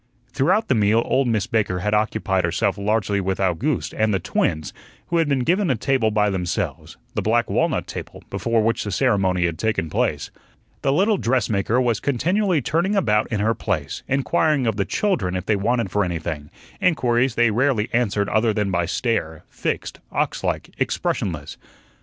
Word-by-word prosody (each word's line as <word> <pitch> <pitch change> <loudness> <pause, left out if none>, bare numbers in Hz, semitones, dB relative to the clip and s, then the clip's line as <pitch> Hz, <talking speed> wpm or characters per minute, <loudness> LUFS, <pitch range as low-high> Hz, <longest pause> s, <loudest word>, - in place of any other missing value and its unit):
Throughout 180 +11 +2
the - - +3
meal 110 0 +3
old 135 -1 +1
Miss 110 -5 +1
Baker 105 -5 0
had 105 +1 0
occupied 105 -3 +1
herself 85 0 0
largely 100 0 0
with 95 0 -2
Owgooste 100 - 0
and 110 0 +2
the 100 - +2
twins, 80 -2 -1 0.4
who 170 - +1
had 165 -3 +2
been 135 -2 +1
given 180 +5 +2
a 130 - +3
table 125 -1 +1
by 105 -1 +2
themselves 90 -2 -3 0.2
the - - -1
black 115 +1 +1
walnut - - +1
table - - -8
before 115 -1 +1
which 115 +1 0
the 105 - -4
ceremony 95 -1 +2
had 85 -2 -2
taken 105 -7 -1
place. - - -1 0.5
The 135 - +1
little 200 +8 +3
dressmaker 115 - +1
was 120 -4 +1
continually 175 - +1
turning 170 - +1
about 105 - +2
in 105 -2 0
her 110 +2 +2
place, 85 -11 -3
inquiring 140 +1 +1
of 110 -3 +1
the 100 -1 0
children 95 - 0
if 90 0 -3
they 105 - +2
wanted 110 +1 0
for 105 - +2
anything; 80 -4 -4 0.3
inquiries 125 -8 +2
they 120 -1 +3
rarely 120 -1 +1
answered 105 -4 +1
other 110 +1 +2
than 105 -3 0
by 85 -2 0
stare, 90 -8 -2
fixed, - - -3
ox - - -1
like, - - -2
expressionless. 75 -6 -2
110 Hz, 175 wpm, -22 LUFS, 95-130 Hz, 0.5 s, the